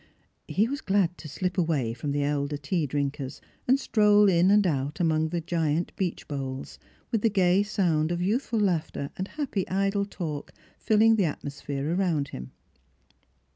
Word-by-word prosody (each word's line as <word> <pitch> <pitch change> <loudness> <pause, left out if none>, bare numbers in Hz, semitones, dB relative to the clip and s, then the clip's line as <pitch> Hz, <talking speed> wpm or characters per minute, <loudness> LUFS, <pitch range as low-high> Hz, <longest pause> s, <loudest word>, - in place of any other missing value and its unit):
He 210 +4 +2
was 280 +3 -4
glad 190 -3 +1
to 155 - -8
slip 180 +5 -2
away 145 -9 0
from 140 +5 -4
the 145 0 0
elder 145 0 -1
tea 150 +3 -1
drinkers, 140 0 -3 0.3
and 260 +2 +4
stroll 210 -4 +4
in 175 0 +4
and 205 0 +5
out 145 -1 -1
among 160 -2 +2
the 170 +1 -2
giant 165 0 -1
beech 185 -3 -3
boles, 135 -2 -5 0.3
with 225 - +1
the 225 - +3
gay 190 -2 +3
sound 175 -6 +1
of 175 - -1
youthful 225 +5 0
laughter 165 -7 -1
and 190 - -4
happy 265 -10 -3
idle 195 +1 +1
talk 155 -7 -5 0.3
filling 220 +1 +4
the 200 - +3
atmosphere 140 0 -3
around 170 -7 0
him. 65 0 -8
170 Hz, 165 wpm, -27 LUFS, 145-200 Hz, 0.3 s, and